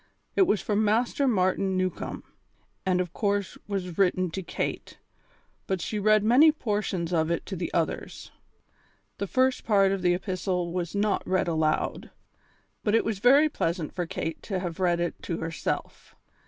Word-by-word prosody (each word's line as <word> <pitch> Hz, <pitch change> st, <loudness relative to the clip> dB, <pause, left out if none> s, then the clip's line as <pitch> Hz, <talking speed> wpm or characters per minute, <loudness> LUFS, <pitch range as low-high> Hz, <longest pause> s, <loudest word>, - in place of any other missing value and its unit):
It 380 Hz, -, +4 dB
was 210 Hz, -, +1 dB
from 210 Hz, 0 st, +1 dB
Master 235 Hz, +6 st, +1 dB
Martin 190 Hz, -3 st, +1 dB
Newcombe, 185 Hz, -1 st, -3 dB, 0.6 s
and 185 Hz, -1 st, +2 dB
of 180 Hz, -1 st, -2 dB
course 200 Hz, -2 st, -1 dB
was 185 Hz, -4 st, -4 dB
written 185 Hz, -2 st, +2 dB
to 190 Hz, -, -4 dB
Kate, 175 Hz, -, -4 dB, 0.7 s
but 190 Hz, -1 st, -1 dB
she 210 Hz, +5 st, -3 dB
read 215 Hz, 0 st, +4 dB
many 260 Hz, +8 st, +6 dB
portions 205 Hz, -, -2 dB
of 160 Hz, -1 st, +2 dB
it 170 Hz, -, -1 dB
to 195 Hz, -, -5 dB
the 170 Hz, -1 st, -4 dB
others. 165 Hz, -2 st, -3 dB, 0.9 s
The 200 Hz, -, -2 dB
first 260 Hz, +4 st, +1 dB
part 195 Hz, -3 st, +4 dB
of 195 Hz, -1 st, -1 dB
the 175 Hz, 0 st, +3 dB
epistle 180 Hz, -2 st, -2 dB
was 180 Hz, 0 st, -3 dB
not 205 Hz, 0 st, +1 dB
read 185 Hz, -1 st, +1 dB
aloud, 160 Hz, -2 st, 0 dB, 0.7 s
but 210 Hz, 0 st, +2 dB
it 225 Hz, -, +3 dB
was 220 Hz, -4 st, -2 dB
very 275 Hz, +7 st, +6 dB
pleasant 165 Hz, -, -2 dB
for 175 Hz, -2 st, -3 dB
Kate 160 Hz, 0 st, -4 dB
to 195 Hz, -, -3 dB, 0.2 s
read 175 Hz, -2 st, +1 dB
it 175 Hz, -1 st, -3 dB
to 170 Hz, -, -3 dB
herself. 165 Hz, -1 st, -4 dB
190 Hz, 165 wpm, -27 LUFS, 175-210 Hz, 0.9 s, many